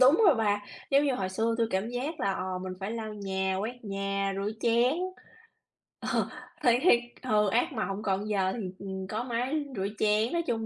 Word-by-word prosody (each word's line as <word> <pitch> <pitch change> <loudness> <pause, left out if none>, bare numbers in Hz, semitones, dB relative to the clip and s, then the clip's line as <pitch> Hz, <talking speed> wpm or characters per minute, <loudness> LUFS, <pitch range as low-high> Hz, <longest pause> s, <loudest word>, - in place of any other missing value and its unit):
đúng 275 - +7
rồi 335 - +7
bà, 205 -3 +2 0.3
giống 280 +1 +5
như 275 -3 +2
hồi 190 -5 -1
xưa 225 +4 0
tui 230 - +3
cảm 190 +4 0
giác 270 +5 -3
là, 195 - +2
ờ, 185 -1 -3
mình 185 0 -5
phải 195 +2 -3
lau 220 -2 -4
nhà, 190 -1 -1
quét 235 +3 -5
nhà, 195 0 -1
rửa 200 +1 -1
chén. 235 +3 +4 1.1
Ờ, - - 0 0.3
thì 240 0 +5
thiệt 260 -6 +6 0.2
ừ, 210 -4 +3
ác 250 - +1
mộng, 205 -3 -2
còn 200 +1 0
giờ 190 -2 +1
thì, 240 - -4 0.2
ừm, 190 -1 -5
có 215 +4 -2
máy 255 +5 -1
rửa 195 0 -1
chén, 215 +4 +3
nói 340 - +2
chung 225 -2 0
215 Hz, 205 wpm, -29 LUFS, 195-245 Hz, 1.1 s, đúng